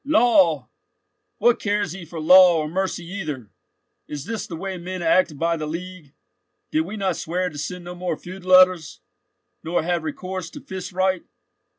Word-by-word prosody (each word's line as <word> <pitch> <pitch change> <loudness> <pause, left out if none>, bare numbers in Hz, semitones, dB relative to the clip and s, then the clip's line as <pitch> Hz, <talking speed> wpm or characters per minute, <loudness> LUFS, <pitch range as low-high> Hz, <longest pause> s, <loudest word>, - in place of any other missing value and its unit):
"Law?—what 280 - +1
cares 205 -4 -1
he 185 0 -8
for 165 0 -8
law 180 +2 +7
or 155 -1 -1
mercy 185 +1 -2
either? 155 - -6 0.6
Is 145 -2 -6
this 225 +1 -4
the 170 - -6
way 190 +2 -5
men 180 +1 -5
act 165 -2 +3
by 170 +2 +1
the 155 -2 -4
League? 170 -2 -7 0.6
Did 315 - +2
we 215 - -6
not 195 -2 -1
swear 180 +2 -2
to 150 - -10
send 180 +4 -5
no 175 - -6
more 180 -3 -3
feud 185 +1 -10
letters, 185 -3 +4 0.6
nor 165 0 0
have 175 0 0
recourse 185 +2 -5
to - - -10
fist 190 -1 -7
right?" 185 -1 +1
180 Hz, 170 wpm, -23 LUFS, 165-190 Hz, 0.6 s, law